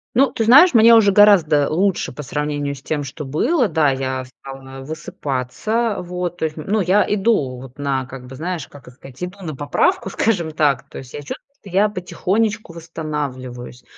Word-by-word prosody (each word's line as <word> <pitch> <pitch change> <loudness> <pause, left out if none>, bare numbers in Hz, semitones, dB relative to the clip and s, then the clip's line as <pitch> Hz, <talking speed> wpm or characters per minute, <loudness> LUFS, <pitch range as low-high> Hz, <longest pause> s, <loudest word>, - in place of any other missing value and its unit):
Ну, 270 +2 +4
ты 225 - -1
знаешь, 285 +10 +7
мне 230 0 +7
уже 210 -3 +5
гораздо 180 -8 +5
лучше 185 +3 0
по 150 - -8
сравнению 145 0 -2
с 135 - -13
тем, 150 0 -3
что 145 +2 -7
было. 240 - +1
Да, 155 -5 +2
я 130 -1 -3
стала 135 +1 -11
высыпаться, 155 - -3
вот. 180 -1 -4
То 160 - -1
есть, 155 0 -4
ну 200 +7 -1
я 190 +3 +3
иду, 195 - +1
вот, 130 -1 -12
на 135 -2 -1
как 130 0 -10
бы 130 - -10
знаешь, 165 0 -4
как 145 - -15
это - - -11
сказать, 135 +2 -11
иду 180 +3 -6
на 155 -5 -5
поправку, 145 +6 0
скажем 185 -7 0
так. 145 -4 +1
То - - -10
есть 130 -1 -12
я - - -5
чувствую, 145 - -6 0.2
что 195 - -12
я 200 +3 +3
потихонечку 205 +1 -2
восстанавливаюсь. 140 -7 -6
155 Hz, 190 wpm, -20 LUFS, 135-200 Hz, 0.2 s, знаешь